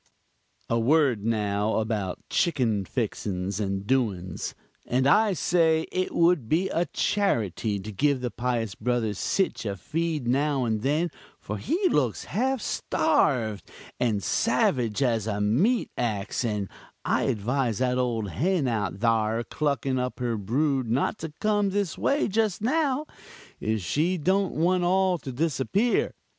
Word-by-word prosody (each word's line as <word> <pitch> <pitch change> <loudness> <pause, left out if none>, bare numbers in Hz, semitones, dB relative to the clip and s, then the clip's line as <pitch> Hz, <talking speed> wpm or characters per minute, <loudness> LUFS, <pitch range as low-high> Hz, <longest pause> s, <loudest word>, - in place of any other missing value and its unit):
"A 115 - +1
word 130 -3 +3
now 105 -1 0
about 110 -4 -2
chickin 120 - +1
fixins 100 -4 -3
and 100 -1 -2
doins. 105 -8 -1 0.3
And 130 +2 +1
I 210 +8 +4
say 165 -2 +2
it 185 0 -1
would 170 -9 +3
be 180 +5 +2
a 175 -1 0
charity 110 - 0
to 105 +3 -7
give 140 +6 +1
the 125 -2 -2
pious 120 -4 -2
brother 120 -1 -1
sich 185 - -1
a 100 -3 -3
feed 155 - -2
now 135 +1 +1
and 110 -2 -1
then, 150 +7 +1 0.3
for - - -5
he 370 +4 +1
looks 130 - +1
half 260 +4 -1
starved, 125 - 0 0.3
and 110 -5 0
savage 120 0 +1
as 115 -4 +1
a 105 -2 -1
meat 150 - +2
ax; 110 0 -2
and 105 -4 -1 0.4
I - - +1
advise 120 +1 0
that 125 +1 +1
old 115 -6 -1
hen 165 - +1
out 105 -6 -1
thare 115 0 +2
clucking 140 -1 -1
up 125 +1 -3
her 120 -2 -1
brood 130 +4 0
not 135 - 0
to 160 - -5
come 205 -2 +2
this 200 -3 -1
way 285 +3 +1
just 215 -2 0
now, 290 +2 +1 0.5
if 110 -1 -1
she 160 - 0
don't 190 +4 +1
want 180 +3 +2
all 185 0 +2
to 135 - -6
disappear. 165 - 0
130 Hz, 145 wpm, -26 LUFS, 110-170 Hz, 0.5 s, I